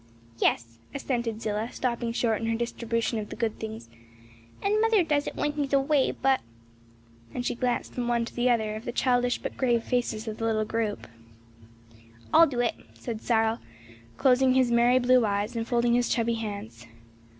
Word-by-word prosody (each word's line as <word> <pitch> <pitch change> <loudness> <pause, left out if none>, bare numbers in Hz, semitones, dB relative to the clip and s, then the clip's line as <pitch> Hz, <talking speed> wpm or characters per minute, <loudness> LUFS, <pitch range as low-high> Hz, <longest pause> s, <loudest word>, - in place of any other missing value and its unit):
"Yes," 115 0 0 0.2
assented 235 -5 -2
Zillah, 215 +2 -2
stopping 235 -2 -2
short 230 -2 0
in 225 - -2
her 230 - +1
distribution 230 -1 -2
of 210 - -6
the - - -6
good 225 -2 -2
things; 220 - -6 0.7
"and 420 +2 +1
mother 450 -4 +4
does 295 -3 0
it - - -5
when 295 - 0
he's 290 -2 -3
away, 275 0 +3
but 270 -1 +1 0.5
" 115 0 -27
and 245 - -3
she - - 0
glanced 245 0 -2
from 245 -1 -3
one 235 -1 +1
to - - -10
the 245 +1 +2
other 220 -3 +1
of 220 - -8
the 240 - -2
childish 245 0 +1
but - - -6
grave 240 -3 +1
faces 235 -3 -2
of 215 0 -4
the 225 - -1
little 215 -1 +1
group. 220 -1 -2 1.3
"I'll 330 +1 +8
do 250 -4 -1
it," 240 - +1 0.2
said 225 -3 -6
Cyril, 225 -1 +1 0.6
closing 260 0 +4
his 255 -2 +3
merry 240 +1 +4
blue 255 0 +4
eyes 205 +2 -1
and 225 0 -2
folding 235 -1 +2
his 245 0 +2
chubby 235 -1 +1
hands. 200 - -6
235 Hz, 185 wpm, -27 LUFS, 220-250 Hz, 1.3 s, I'll